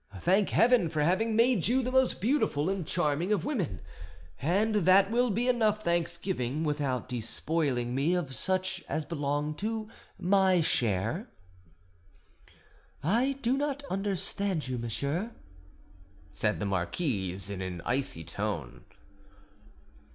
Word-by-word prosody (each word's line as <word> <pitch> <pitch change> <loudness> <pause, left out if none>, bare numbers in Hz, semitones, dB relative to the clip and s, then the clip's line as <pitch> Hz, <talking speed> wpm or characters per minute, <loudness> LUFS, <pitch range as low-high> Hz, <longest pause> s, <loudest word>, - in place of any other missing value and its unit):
Thank 190 - +2
Heaven 230 -7 +4
for 155 -2 0
having 215 +7 +1
made 230 -6 +3
you 255 +3 +2
the 250 - -2
most 260 -1 +2
beautiful 195 - +1
and 190 -5 -3
charming 165 +2 0
of 210 - +1
women, 180 - -2 0.6
and 200 - +2
that 195 +1 +5
will 245 +1 +2
be 230 +4 0
enough 215 -4 +2
thanksgiving 170 -4 -1
without 145 -5 -1
despoiling 125 +1 -1
me 145 +7 +1
of 155 -7 -2
such 185 +2 -1
as 155 -1 -2
belong 145 -1 -2
to 220 +2 -3 0.3
my 190 -1 +3
share." 120 - 0 1.7
"I 235 - +2
do 245 +3 +2
not 285 0 -2
understand 195 -3 -1
you, 125 -1 -3
monsieur," 140 - -2 1.0
said - - 0
the - - -2
marquise 95 - -1
in 95 -2 -5
an 90 -2 -5
icy 125 -10 -1
tone. 95 - -4
175 Hz, 125 wpm, -29 LUFS, 130-215 Hz, 1.7 s, that